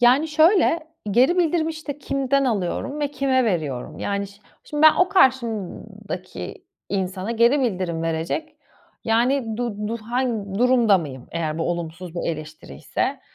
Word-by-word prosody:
Yani, 260 Hz, +6 st, +5 dB
şöyle, 325 Hz, 0 st, +3 dB, 0.2 s
geri 260 Hz, -, +4 dB
bildirimi, 325 Hz, -1 st, +2 dB
işte, 310 Hz, -3 st, -6 dB
kimden 275 Hz, 0 st, 0 dB
alıyorum 240 Hz, +6 st, -2 dB
ve 290 Hz, -, +1 dB
kime 265 Hz, -2 st, +1 dB
veriyorum? 155 Hz, -, -2 dB
Yani, 200 Hz, 0 st, -2 dB
şi 200 Hz, +1 st, -18 dB, 0.2 s
şimdi 295 Hz, 0 st, -3 dB
ben 315 Hz, -1 st, +8 dB
o 360 Hz, -, +3 dB
karşımdaki 260 Hz, -, -1 dB, 0.2 s
insana 190 Hz, +1 st, -2 dB
geri 235 Hz, +5 st, +4 dB
bildirim 180 Hz, -8 st, -1 dB
verecek 165 Hz, -, -2 dB, 0.5 s
Yani, 230 Hz, 0 st, +1 dB
du 210 Hz, -4 st, -3 dB
du 230 Hz, -, -2 dB
hang 225 Hz, -4 st, -2 dB
durumda 240 Hz, -5 st, +4 dB
mıyım, 130 Hz, -6 st, -7 dB
eğer 160 Hz, -2 st, -2 dB
bu 165 Hz, -, -1 dB
olumsuz 170 Hz, 0 st, -5 dB
bir 175 Hz, -, -2 dB
eleştiriyse? 155 Hz, -, -4 dB
235 Hz, 140 wpm, -23 LUFS, 185-275 Hz, 0.5 s, ben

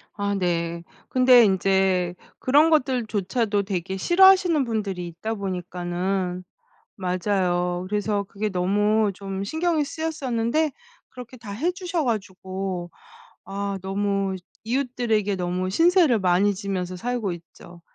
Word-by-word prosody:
아 200 Hz, -1 st, -1 dB
네. 170 Hz, -2 st, -1 dB, 0.3 s
근데 255 Hz, -1 st, +6 dB
인제 190 Hz, -2 st, +2 dB, 0.2 s
그런 295 Hz, +5 st, +4 dB
것들조차도 230 Hz, -, +1 dB
되게 190 Hz, -1 st, -3 dB
싫어하시는 360 Hz, -, +5 dB
분들이 200 Hz, -7 st, -3 dB
있다 175 Hz, +7 st, -4 dB
보니까는 180 Hz, -1 st, -3 dB, 0.5 s
맞아요 180 Hz, -1 st, 0 dB
그래서 205 Hz, 0 st, -1 dB
그게 205 Hz, +2 st, -3 dB
너무 205 Hz, +3 st, +1 dB
좀 195 Hz, 0 st, -5 dB
신경이 320 Hz, -, 0 dB
쓰였었는데 295 Hz, -2 st, -1 dB, 0.4 s
그렇게 250 Hz, 0 st, -10 dB
다 215 Hz, -4 st, -9 dB
해 300 Hz, -, 0 dB
주셔 360 Hz, -3 st, -2 dB
가지고 190 Hz, -5 st, -3 dB, 0.6 s
아 200 Hz, 0 st, -3 dB
너무 195 Hz, 0 st, -1 dB, 0.3 s
이웃들에게 230 Hz, -4 st, 0 dB
너무 180 Hz, +1 st, -2 dB
신세를 330 Hz, -, +4 dB
많이 190 Hz, +2 st, +3 dB
지면서 185 Hz, -2 st, -3 dB
살고 235 Hz, 0 st, -2 dB
있죠. 170 Hz, 0 st, -14 dB
200 Hz, 265 characters per minute, -24 LUFS, 185-245 Hz, 0.6 s, 근데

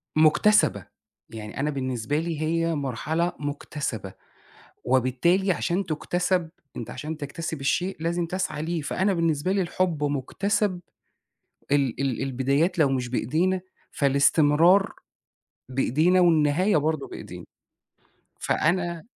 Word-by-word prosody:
مكتسبة، 160 Hz, +7 st, +4 dB, 0.4 s
يعني 110 Hz, +2 st, -8 dB
أنا 150 Hz, +2 st, 0 dB
بالنسبة 130 Hz, 0 st, -2 dB
لي 165 Hz, -2 st, -3 dB
هي 165 Hz, +1 st, 0 dB
مرحلة 150 Hz, +6 st, -1 dB
مكتسبة، 140 Hz, -8 st, -4 dB, 0.7 s
وبالتالي 130 Hz, +10 st, +2 dB
عشان 180 Hz, +2 st, -1 dB
تُكتسب 175 Hz, +2 st, -1 dB, 0.3 s
أنت 115 Hz, -, -6 dB
عشان 155 Hz, +1 st, -5 dB
تَكتسب 155 Hz, +1 st, -5 dB
الشيء 180 Hz, +7 st, 0 dB
لازم 170 Hz, +1 st, -1 dB
تسعى 180 Hz, -4 st, -3 dB
ليه، 165 Hz, -1 st, -2 dB
فأنا 190 Hz, +6 st, 0 dB
بالنسبة 165 Hz, +1 st, 0 dB
لي 195 Hz, -1 st, +1 dB
الحب 170 Hz, -4 st, -1 dB
مكتسب 180 Hz, -, -1 dB, 0.9 s
ال 135 Hz, -3 st, +1 dB
ال 135 Hz, -2 st, -1 dB
البدايات 135 Hz, +6 st, 0 dB
لو 150 Hz, -3 st, +4 dB
مش 125 Hz, -2 st, -1 dB
بإيدينا 165 Hz, +10 st, 0 dB, 0.3 s
فالاستمرار 150 Hz, +6 st, +4 dB, 0.8 s
بإيدينا 155 Hz, +8 st, +2 dB
والنهاية 165 Hz, +2 st, +3 dB
برضه 155 Hz, -1 st, -1 dB
بإيدينا. -, -, -9 dB, 0.9 s
فأنا 170 Hz, 0 st, 0 dB
155 Hz, 110 wpm, -25 LUFS, 140-175 Hz, 0.9 s, مكتسبة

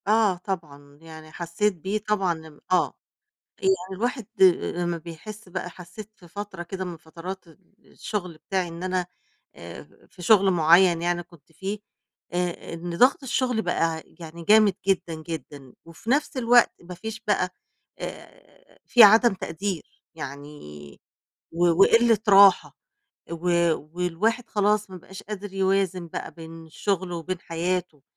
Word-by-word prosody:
آه 215 Hz, -2 st, +4 dB
طبعًا، 150 Hz, -7 st, -7 dB
يعني 160 Hz, -1 st, -12 dB
حسيت 175 Hz, +5 st, -1 dB
بيه 190 Hz, +5 st, -3 dB
طبعًا 180 Hz, -6 st, 0 dB
ام 150 Hz, -2 st, -17 dB
آه، 185 Hz, -, +2 dB, 0.7 s
يعني 385 Hz, -1 st, +3 dB, 0.2 s
الواحد 245 Hz, +2 st, -2 dB, 0.2 s
آآ، 185 Hz, -2 st, +5 dB
لمّا 175 Hz, -1 st, -1 dB
بيحس 180 Hz, +6 st, -10 dB
بقى 180 Hz, 0 st, -4 dB
حسيت 180 Hz, +4 st, -11 dB
في 175 Hz, -, -17 dB
فترة 190 Hz, 0 st, -7 dB
كده 190 Hz, +2 st, -5 dB
من 175 Hz, -2 st, -6 dB
فترات 170 Hz, +4 st, -9 dB
ال 165 Hz, -, -19 dB, 0.3 s
الشغل 180 Hz, -5 st, -5 dB
بتاعي 185 Hz, +2 st, -2 dB
إن 170 Hz, +1 st, -8 dB
أنا 185 Hz, -1 st, -1 dB, 0.5 s
آآ، -, -, -10 dB, 0.2 s
في 180 Hz, -, -15 dB
شغل 195 Hz, +1 st, +5 dB
معيّن 170 Hz, +1 st, +5 dB
يعني 175 Hz, 0 st, -1 dB
كنت 170 Hz, -2 st, -21 dB
فيه 195 Hz, +6 st, -5 dB, 0.5 s
آآ، 175 Hz, -1 st, -3 dB
إن 170 Hz, +1 st, -5 dB
ضغط 265 Hz, -, +4 dB
الشغل 250 Hz, -2 st, 0 dB
بقى 165 Hz, -5 st, -1 dB
يعني 165 Hz, 0 st, -11 dB
جامد 210 Hz, 0 st, +5 dB
جدًا، 185 Hz, -3 st, +1 dB
جدًا 145 Hz, -4 st, -8 dB
وفي 165 Hz, +7 st, -10 dB
نفس 285 Hz, +2 st, +1 dB
الوقت 240 Hz, -1 st, +5 dB
ما 180 Hz, +1 st, -9 dB
فيش 220 Hz, +3 st, -6 dB
بقى 190 Hz, -3 st, +2 dB, 0.5 s
آآ، -, -, -11 dB
في 240 Hz, -, +7 dB
عدم 220 Hz, +2 st, +7 dB
تقدير 185 Hz, 0 st, -5 dB
يعني 140 Hz, -, -9 dB, 0.5 s
و 175 Hz, +1 st, +2 dB, 0.2 s
وقلة 230 Hz, -1 st, +5 dB
راحة 195 Hz, -1 st, +6 dB, 0.5 s
و 170 Hz, 0 st, -6 dB, 0.5 s
والواحد 205 Hz, +7 st, -1 dB
خلاص، 210 Hz, 0 st, +1 dB
ما 185 Hz, -, -7 dB
بقاش 190 Hz, +2 st, -12 dB
قادر 205 Hz, -1 st, -7 dB
يوازن 190 Hz, -2 st, 0 dB
بقى -, -, -6 dB
بين 165 Hz, -1 st, -11 dB
شغله 185 Hz, +1 st, -2 dB
وبين 175 Hz, +2 st, -4 dB
حياته، 175 Hz, -3 st, -3 dB
180 Hz, 145 wpm, -25 LUFS, 165-205 Hz, 0.7 s, في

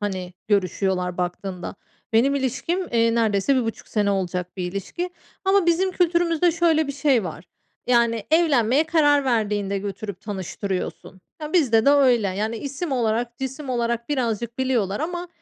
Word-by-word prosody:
hani, 185 Hz, -3 st, -4 dB, 0.2 s
görüşüyorlar 185 Hz, -2 st, 0 dB
baktığında. 180 Hz, +1 st, -4 dB, 0.4 s
Benim 265 Hz, +5 st, +4 dB
ilişkim, 335 Hz, +7 st, -1 dB
eee, 230 Hz, 0 st, +3 dB
neredeyse 220 Hz, +3 st, +2 dB
1.5 225 Hz, -3 st, -3 dB
sene 205 Hz, -2 st, +1 dB
olacak 180 Hz, -1 st, -2 dB
bir 180 Hz, -1 st, -3 dB
ilişki 345 Hz, -, -4 dB, 0.3 s
ama 385 Hz, -1 st, +3 dB
bizim 360 Hz, +3 st, +2 dB
kültürümüzde 340 Hz, -1 st, +2 dB
şöyle 325 Hz, -2 st, +2 dB
bir 280 Hz, -, -3 dB
şey 270 Hz, -7 st, +2 dB
var, 165 Hz, 0 st, -7 dB, 0.4 s
yani, 235 Hz, -2 st, +2 dB
evlenmeye 295 Hz, -4 st, +3 dB
karar 290 Hz, -3 st, +3 dB
verdiğinde 205 Hz, -5 st, 0 dB
götürüp 200 Hz, -1 st, -6 dB
tanıştırıyorsun. 190 Hz, -1 st, -5 dB, 0.2 s
Ya, 300 Hz, -, -5 dB
bizde 250 Hz, -10 st, +3 dB
de 280 Hz, -, +7 dB
öyle. 250 Hz, -7 st, +4 dB
Yani, 215 Hz, +4 st, -2 dB
isim 280 Hz, +5 st, -4 dB
olarak, 235 Hz, 0 st, -1 dB
cisim 265 Hz, +1 st, -5 dB
olarak 235 Hz, -1 st, -1 dB
birazcık 235 Hz, -4 st, -2 dB
biliyorlar 235 Hz, -7 st, 0 dB
ama, 350 Hz, +2 st, -3 dB
235 Hz, 145 wpm, -23 LUFS, 200-290 Hz, 0.4 s, de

